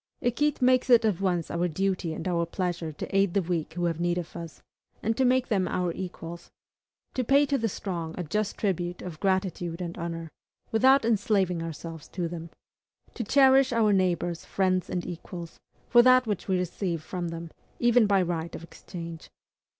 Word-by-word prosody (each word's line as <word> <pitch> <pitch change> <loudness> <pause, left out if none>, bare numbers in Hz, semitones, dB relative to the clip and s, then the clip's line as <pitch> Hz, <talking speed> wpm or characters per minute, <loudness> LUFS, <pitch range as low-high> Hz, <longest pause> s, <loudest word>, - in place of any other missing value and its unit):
Equite 270 +3 0
makes 255 0 +4
it 235 -2 +6
at 200 -4 +1
once 175 -4 0
our 170 +1 0
duty 185 0 -1
and 160 - -5
our 170 -2 +1
pleasure 175 -2 -2
to 155 - -6
aid 195 -2 +3
the 200 - +4
weak 165 -2 -2
who 175 -1 -1
have 165 -1 -1
need 175 0 +1
of 175 -2 -5
us, 165 -3 -8 0.4
and 225 +2 +1
to 265 - +2
make 255 0 +3
them 195 -5 +1
our 180 -1 0
equals; 170 -2 -7 0.6
to 255 - 0
pay 280 +4 +4
to 280 0 0
the 230 -4 0
strong 170 -5 -4
a 180 - -2
just 210 +5 -2
tribute 175 -3 -2
of 170 -4 -7
gratitude 185 -3 -1
and 175 -1 -5
honor, 165 -1 -5 0.4
without 260 +3 +5
enslaving 200 -5 +1
ourselves 165 -1 -7
to 175 -2 -3
them; 165 0 -7 0.6
to 240 - -3
cherish 270 +2 +5
our 220 -3 +3
neighbors, 175 -3 0
friends, 185 -2 0
and 180 - -2
equals, 170 -1 -8 0.3
for 240 - +7
that 255 +1 +6
which 210 -4 -3
we 190 -1 +2
receive 175 -2 -2
from 175 +1 -4
them, 165 0 -6 0.3
even 240 -2 +4
by 195 -2 +3
right 170 -1 -3
of - - -8
exchange. 170 -1 -9
180 Hz, 185 wpm, -27 LUFS, 170-220 Hz, 0.6 s, for